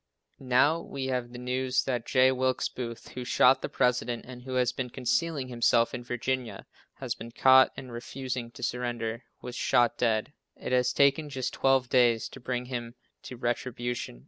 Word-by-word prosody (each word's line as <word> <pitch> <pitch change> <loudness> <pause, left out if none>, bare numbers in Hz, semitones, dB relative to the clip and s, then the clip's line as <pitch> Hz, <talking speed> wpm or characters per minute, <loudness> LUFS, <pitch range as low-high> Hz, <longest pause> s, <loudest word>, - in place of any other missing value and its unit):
Now 135 +5 +3
we 140 -5 -6
have 120 -1 -3
the 125 - -9
news 125 +1 0
that 120 -3 -2
J. 130 0 +4
Wilkes 130 0 0
Booth, 115 -2 -7
who 125 - -6
shot 130 +2 +4
the - - -4
President 125 -1 0
and 125 -1 -9
who 130 0 -6
has 125 -2 +2
been 125 -2 -4
concealing 130 +3 -1
himself 120 -1 +2
in 120 - -5
Virginia, 125 0 -3 0.3
has - - -3
been 115 - -9
caught, 130 +2 +6
and 130 -2 -8
refusing 125 0 -5
to - - -10
surrender 120 -1 -3 0.2
was 125 - -6
shot 120 -2 +2
dead. 115 +3 +1 0.2
It - - -6
has 125 0 +3
taken 140 +2 +3
just 130 -2 -3
twelve 135 -1 +2
days 120 -3 +3
to - - -11
bring 125 0 -3
him 120 -2 -5 0.3
to 125 - -9
retribution. 120 - -3
125 Hz, 175 wpm, -28 LUFS, 120-130 Hz, 0.3 s, caught